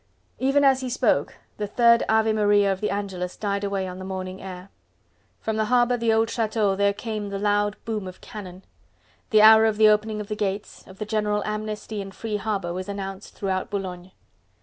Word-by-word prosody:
Even 275 +2 +3
as 265 -1 +4
he 255 - -3
spoke 245 - +1 0.2
the 210 - -3
third 235 +2 +4
Ave 220 0 +3
Maria 205 -2 +3
of 190 - -8
the 210 - 0
Angelus 190 -3 -4
died 200 -1 -2
away 200 -1 -1
on 180 0 -7
the - - -7
morning 185 0 -5
air. 185 0 -8 0.7
From 220 -1 -2
the 215 - +1
harbour 245 +1 +3
and 245 - -2
the 230 -1 +3
old 225 0 +3
Chateau 220 -3 0
there 200 +1 +3
came 210 0 -5
the 200 - -3
loud 205 0 +1
boom 215 -4 -3
of 185 - -10
cannon. 190 -3 -10 0.7
The 215 -1 +5
hour 220 0 +8
of 215 -1 0
the 215 0 +7
opening 215 0 +1
of 210 - -5
the 210 - -3
gates, 205 0 -4
of 190 - -13
the 215 - -4
general 210 -1 0
amnesty 215 0 -4
and 195 -1 -9
free 220 -2 -3
harbour 195 -4 -2
was 185 +2 -5
announced 195 0 -6
throughout 190 -2 -2
Boulogne. 185 -3 -5
210 Hz, 205 wpm, -24 LUFS, 195-220 Hz, 0.7 s, hour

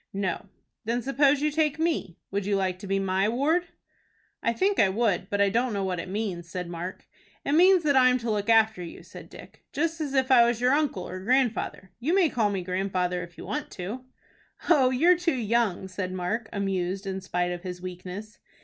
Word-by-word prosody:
"No." 195 -1 -2 0.4
"Then 235 +2 -1
suppose 275 +1 +3
you 300 - +2
take 300 -1 +1
me. 320 - -1
Would 200 0 -2
you 205 - +2
like 185 -2 -1
to 200 - -8
be 195 0 +1
my 195 +1 +1
ward?" 310 +9 +1 0.7
"I - - +1
think 390 - +1
I 195 - +5
would, 195 -2 0
but 205 - -1
I 200 0 +4
don't 235 +3 0
know 200 -1 -1
what 185 -2 -2
it 170 - -6
means," 190 -4 -3
said 180 0 -4
Mark. 175 +2 -6 0.4
"It - - 0
means 360 +3 +5
that 285 -2 +2
I'm 255 -1 +5
to 235 -2 -3
look 210 +1 -1
after 220 -4 +4
you," 170 - -9
said - - -12
Dick, - - -14
"just 325 +3 -1
as 280 -2 -3
if 265 0 +2
I 245 -2 +8
was 235 -1 +1
your 250 +1 +3
uncle 285 -11 0
or 185 - -6
grandfather. 235 -3 0
You 305 +9 +1
may 370 -5 +4
call 220 -4 +1
me 195 -3 -2
grandfather 180 -1 -1
if 175 0 -10
you - - -8
want 295 -1 -4
to." 205 +8 -6 0.7
"Oh, 275 -7 +5
you're 330 +8 +4
too 340 -5 +1
young," 225 -5 0
said 185 0 -4
Mark, 185 +5 -3
amused 195 -1 -2
in 190 0 -4
spite 180 -1 -1
of 175 -1 -5
his 180 -1 -6
weakness. 185 +3 -8
210 Hz, 215 wpm, -27 LUFS, 185-265 Hz, 0.7 s, I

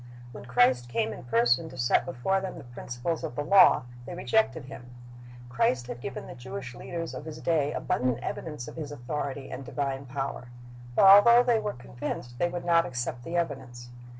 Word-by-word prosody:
When - - -10
Christ 125 0 +3
came 115 -2 -1
in - - -10
person 120 +6 +2
to 130 - -11
set 120 +6 +2
before 180 +5 0
them 190 -2 -5
the 160 - -9
principles 120 +6 -4
of 160 - -5
the 145 - -2
law, 190 -3 +6 0.2
they 175 - -6
rejected 180 - +1
Him. 125 -2 -11 0.6
Christ 125 0 +1
had 120 0 -7
given - - -6
the - - -9
Jewish 120 -2 -7
leaders 165 +7 -6
of - - -7
His 155 -1 -7
day 155 -3 +1
abundant 125 -4 0
evidence 150 -6 -5
of - - -10
His 150 -3 -5
authority 140 0 -5
and 130 +1 -6
divine 135 0 -3
power, 135 -1 -4 0.5
but - - +5
although 235 +5 +9
they 240 -2 +3
were 210 -1 -3
convinced, 120 0 -6
they 175 - +2
would 175 0 -5
not 170 -1 +4
accept 120 -2 -4
the 170 +5 -3
evidence. 130 -7 -4
135 Hz, 190 wpm, -28 LUFS, 120-165 Hz, 0.6 s, although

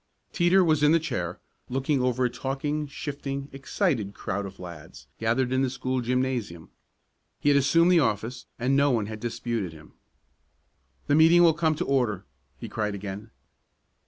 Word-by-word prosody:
Teeter 180 +1 +4
was 155 -3 +2
in 150 +1 +5
the 165 - +5
chair, 90 - -4 0.3
looking 135 +2 0
over 125 0 +1
a - - +2
talking, 140 +4 -3
shifting, 140 -1 -5
excited 135 - -1
crowd 100 0 -3
of 95 - -12
lads 85 -3 -10
gathered 120 +3 +1
in 130 - +2
the 135 - +1
school 130 0 -2
gymnasium. 120 -9 -2 0.7
He 145 - +2
had 145 - +5
assumed 165 +6 +4
the 175 - +6
office, 115 -1 -1
and 130 +3 +1
no 140 +1 +4
one 115 -5 +1
had 110 +1 -7
disputed 115 -5 -3
him. 75 -1 -15 1.1
"The - - +1
meeting 165 +3 +6
will 165 -1 +6
come 160 -1 +1
to - - -2
order!" 115 -8 0 0.3
he - - -6
cried 105 -2 -2
again. 100 +2 -7
130 Hz, 165 wpm, -26 LUFS, 110-145 Hz, 1.1 s, the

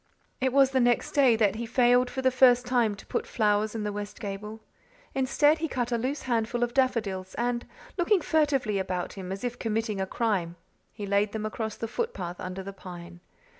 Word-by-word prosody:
It 260 0 +1
was 270 0 +5
the 265 - +2
next 240 -1 +2
day 265 -5 +5
that 215 -2 +2
he 235 0 -4
failed 245 +1 +4
for 265 0 -4
the 260 - +4
first 250 -1 +5
time 240 -4 +2
to 195 - -13
put - - -3
flowers 210 0 +1
in 220 - -2
the 210 -1 -2
west 205 0 -6
gable. 210 +1 -6 0.5
Instead, 290 +4 +3
he 325 - -1
cut 245 -4 -2
a 235 - +2
loose 265 +5 -2
handful 235 -1 0
of 240 0 -1
daffodils 215 -8 0
and, 240 0 -1 0.3
looking 375 +3 +3
furtively 275 -10 +1
about 185 -2 -3
him 190 -2 -7
as 195 +3 -5
if 245 0 -3
committing 220 -2 -1
a 190 - -1
crime, 190 -7 -1 0.4
he 205 - -6
laid 200 +1 +1
them 215 -1 -3
across 220 0 -3
the 225 - -4
footpath 195 - -4
under 185 +1 -5
the 195 +1 -7
pine. 175 -2 -10
225 Hz, 205 wpm, -27 LUFS, 200-250 Hz, 0.5 s, was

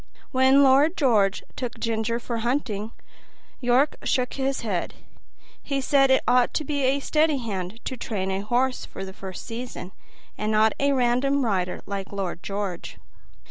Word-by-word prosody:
When 265 +2 +5
Lord 280 +5 +4
George 210 - +2
took 245 -2 -5
Ginger 230 0 -1
for 235 -1 -4
hunting, 225 -3 -2 0.7
York 250 +4 +2
shook 255 -3 0
his 270 0 -1
head; 195 -6 -2 0.7
he 275 -1 -2
said 275 0 +3
it 265 - +4
ought 245 0 +3
to 310 - 0
be 290 -1 -2
a 270 +2 +2
steady 305 +1 +2
hand 205 -4 -4
to 260 - -3
train 195 -5 -3
a 190 - -1
horse 250 +5 0
for 195 - -7
the 190 - -9
first 190 -1 -8
season, 230 -5 -6 0.5
and 215 +1 -1
not 215 0 +4
a 280 0 +2
random 260 +2 +2
rider 185 -4 -1
like 195 -1 -5
Lord 190 -4 -4
George. 195 -3 -4
240 Hz, 160 wpm, -25 LUFS, 200-270 Hz, 0.7 s, When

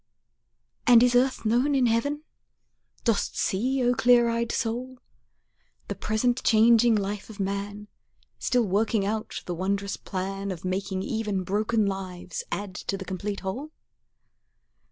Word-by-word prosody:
And 240 -1 +8
is 250 0 +4
earth 255 0 +2
known 250 +6 +2
in 260 -2 +3
heaven? 285 +6 0 0.8
Dost 230 -4 0
see, 255 +7 0
O 245 0 +3
clear 240 0 +4
eyed 230 0 -1
soul, 250 +3 -3 0.9
The - - -1
present 240 +4 0
changing 230 +1 +5
life 205 0 -3
of 215 -1 -11
man 200 +1 -3 0.5
Still 250 -2 +2
working 205 +1 +1
out 215 +1 -3
the 175 - -3
wondrous 195 +3 -2
plan 195 +1 -4
Of 185 -2 -6
making 190 0 -2
even 210 -3 -2
broken 215 +3 +1
lives 195 - -4
add 200 -2 -4
to 195 - -4
the 190 - -7
complete 200 +2 -4
whole? 225 +11 -4
215 Hz, 135 wpm, -26 LUFS, 195-240 Hz, 0.9 s, And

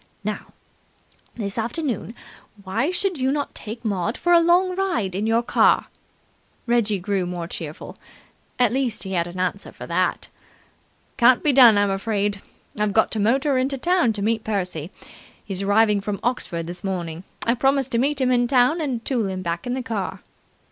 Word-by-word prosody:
"Now, - - -4 0.9
this 205 -1 -4
afternoon, 240 0 -3 0.5
why 225 - -1
should 365 -2 -1
you 260 +1 +1
not 290 0 -2
take 230 +2 -8
Maud 205 +2 -1
for 350 - +2
a 340 - +8
long 355 +2 +3
ride 350 - -1
in 205 +4 -1
your 230 +1 +2
car?" - - +3 0.8
Reggie 235 -4 +1
grew 190 0 -1
more 175 -1 -4
cheerful. 160 -3 -7 0.6
At 245 -2 +3
least 255 -4 -1
he 190 - -6
had 170 -1 0
an 175 +1 -8
answer 185 +2 -2
for - - -9
that. - - -1 0.9
"Can't 245 0 +5
be 295 - +3
done, 240 -5 +8
I'm 205 -1 +2
afraid. 200 0 -1 0.4
I've 210 -1 +1
got - - +3
to 220 - -1
motor 265 +6 +2
into 270 +2 -1
town 345 -3 +2
to 205 -1 -3
meet 220 +1 0
Percy. 180 -7 -3 0.6
He's 195 -2 -4
arriving 205 +1 +3
from 200 0 -3
Oxford 175 -9 -2
this 175 +4 -8
morning. 175 -3 -4 0.2
I 230 - +3
promised 270 +1 +1
to 235 - +1
meet 280 +2 +1
him 255 -1 +2
in 245 -1 +3
town 255 +6 +3
and 255 -6 -3
tool 240 -6 0
him 185 -1 -4
back 170 +4 -3
in 245 - -1
the 260 - -3
car." 195 -4 -4
225 Hz, 180 wpm, -23 LUFS, 195-260 Hz, 0.9 s, a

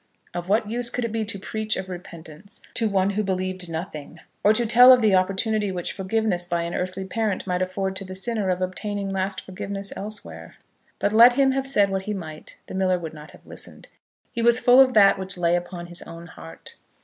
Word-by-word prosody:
Of 175 +1 -5
what 215 +1 +2
use 235 +2 -1
could 245 0 -3
it 230 - -4
be 225 0 -1
to 205 -1 -4
preach 215 +3 -3
of 190 - -5
repentance 175 +1 -11
to 225 -2 0
one 195 0 +1
who 205 +2 -1
believed 185 -2 -3
nothing; 160 -1 -7 0.2
or 210 - +6
to 235 +2 +1
tell 245 +3 +8
of 255 - +7
the 210 -3 +4
opportunity 195 +2 +1
which 180 -2 -4
forgiveness 195 -2 0
by 170 -1 -2
an 170 +1 -4
earthly 185 +1 -3
parent 215 0 -2
might 180 -1 -1
afford 190 +1 -2
to 195 - -4
the 185 0 -8
sinner 205 0 -1
of 185 0 0
obtaining 200 +2 -4
lasting 190 0 -2
forgiveness 195 +1 -5
elsewhere? 210 +1 -8 0.4
But 205 - 0
let 235 +3 +8
him 270 +1 +3
have 270 0 -2
said 205 -7 +3
what 190 0 -2
he 210 - -3
might, 155 -5 -9
the - - -10
miller 185 -1 +1
would 165 -3 -7
not 150 0 -11
have - - -18
listened. - - -11 0.4
He 235 - -3
was 235 +1 +4
full 250 +1 +6
of 255 -2 +3
that 200 -2 +6
which 190 0 -5
lay 170 0 +2
upon 175 0 -5
his 175 0 -5
own 165 0 -10
heart. 165 -1 -12
195 Hz, 220 wpm, -24 LUFS, 180-215 Hz, 0.4 s, tell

